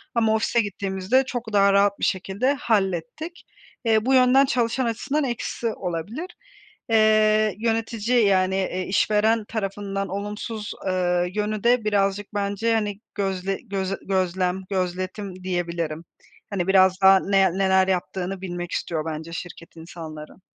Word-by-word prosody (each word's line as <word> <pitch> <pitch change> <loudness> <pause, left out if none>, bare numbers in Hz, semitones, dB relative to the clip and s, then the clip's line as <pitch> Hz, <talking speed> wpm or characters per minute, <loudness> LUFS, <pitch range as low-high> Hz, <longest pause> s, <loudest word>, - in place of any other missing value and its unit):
ama 225 -2 +3
ofise 230 +2 +2
gittiğimizde 200 +4 0
çok 235 -4 -5
daha 200 -1 +5
rahat 200 0 +3
bir - - +1
şekilde 195 +8 0
hallettik. 235 - -2 0.4
Eee, 220 -1 +3
bu 265 - +2
yönden 260 +1 +6
çalışan 245 0 0
açısından 275 +6 -1
eksi 240 -2 -3
olabilir. 195 - -4 0.6
Eee 215 -2 +4
yönetici, 225 +1 +1
yani, 190 -1 +2
eee, 185 -1 -1
işveren 215 +3 +2
tarafından 195 -2 -3
olumsuz, 210 +2 -5 0.2
eee, 180 -1 +1
yönü 210 0 -2
de 240 0 +3
birazcık 200 0 0
bence, 205 +3 0
hani, 205 -2 -2 0.2
gözle 195 -1 -2
göz 195 -2 -2
gözlem 185 -1 0
gözletim 185 0 -3
diyebilirim. 170 -3 -3 0.4
Hani, 190 -3 -2
biraz 190 0 +4
daha 190 0 +7
ne 195 -2 +2
neler 190 -1 +3
yaptığını 185 0 -2
bilmek 175 -2 -5
istiyor 160 -2 -2
bence 160 +1 -5
şirket 170 0 -8
insanların. 160 -1 -10
195 Hz, 130 wpm, -24 LUFS, 185-220 Hz, 0.6 s, daha